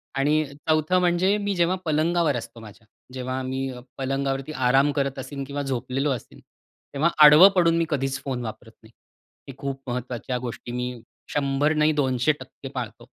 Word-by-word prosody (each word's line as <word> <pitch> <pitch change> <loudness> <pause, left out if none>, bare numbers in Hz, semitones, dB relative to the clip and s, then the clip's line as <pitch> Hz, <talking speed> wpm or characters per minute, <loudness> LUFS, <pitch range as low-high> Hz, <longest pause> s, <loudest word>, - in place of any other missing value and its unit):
आणि 150 +3 +2
4 155 +4 +1
म्हणजे 180 +3 +2
मी 205 -1 -2
जेव्हा 175 +1 +2
पलंगावर 160 -1 +1
असतो 115 0 -8
माझ्या. 110 +1 -14 0.3
जेव्हा 130 0 -3
मी 130 +1 -3 0.3
पलंगावरती 135 +1 -2 0.2
आराम 135 +3 +4
करत 140 -2 -2
असेन 140 +1 -6
किंवा 140 +1 -4
झोपलेलो 135 +1 -2
असेन, 125 - -6 0.5
तेव्हा 155 +5 +2 0.2
आडवं 155 +7 +9
पडून 165 -2 +4
मी 165 - +2
कधीचं 135 -3 -1
फोन 125 -3 -3
वापरत 110 +1 -8
नाही. 110 - -17 0.6
ही 135 - -8
खूप 135 -1 -5
महत्त्वाच्या 125 0 -3
गोष्टी 120 -1 -6
मी 125 -1 -4 0.3
100 145 +2 +1
नाही 155 0 +3
200% 135 0 -1
पाळतो. - - -6
135 Hz, 155 wpm, -24 LUFS, 130-155 Hz, 0.6 s, आडवं